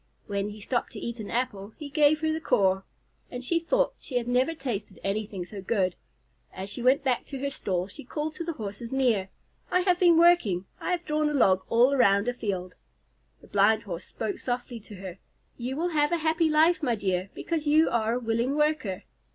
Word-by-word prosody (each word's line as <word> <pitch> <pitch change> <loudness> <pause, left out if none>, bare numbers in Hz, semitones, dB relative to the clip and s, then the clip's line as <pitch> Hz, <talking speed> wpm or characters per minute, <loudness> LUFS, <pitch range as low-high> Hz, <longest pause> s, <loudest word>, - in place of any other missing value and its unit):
When 200 -1 -2
he 210 +1 -9
stopped 240 +4 -2
to - - -7
eat 235 0 -5
an 210 - -6
apple, 220 -4 -2
he 300 - -7
gave 300 +1 +3
her 315 0 +1
the 320 - -3
core, 190 -7 +2 0.5
and 245 0 -6
she 335 +6 +1
thought - - +1
she 255 - -4
had 240 -1 -2
never 255 +6 +2
tasted 215 -9 -5
anything 200 -2 -3
so 195 +2 -8
good. 190 -2 0 0.6
As 190 +1 -6
she 240 - -5
went 260 +3 +4
back 255 -3 +1
to 275 - -6
her 280 +1 -2
stall, 185 -8 -2
she 200 - -10
called 300 +4 -4
to 335 - -5
the 335 0 -3
Horses 220 -1 -6
near, 240 -8 +1 0.4
"I 365 - +3
have 360 -1 +2
been 345 -3 +6
working. 330 - +4
I - - -4
have 355 -1 -1
drawn 300 0 +1
a 295 - -2
log 190 -8 +4
all 245 +4 +5
around 200 -5 +4
a 245 - +1
field." 185 -6 -4 0.7
The - - -16
Blind 210 +2 +3
Horse 175 -3 -6
spoke 220 -3 -4
softly 245 -1 -3
to 210 0 -12
her. 190 -1 -8 0.4
"You 250 +2 -4
will 345 +3 0
have 295 -2 +2
a 345 - +2
happy 320 0 +2
life, 320 +3 +4
my 245 -6 +1
dear, 190 -2 -1
because 320 -3 -3
you 310 +2 +5
are 225 -1 +1
a 245 - 0
willing 235 +3 0
worker." 300 -11 0
245 Hz, 215 wpm, -27 LUFS, 200-305 Hz, 0.7 s, been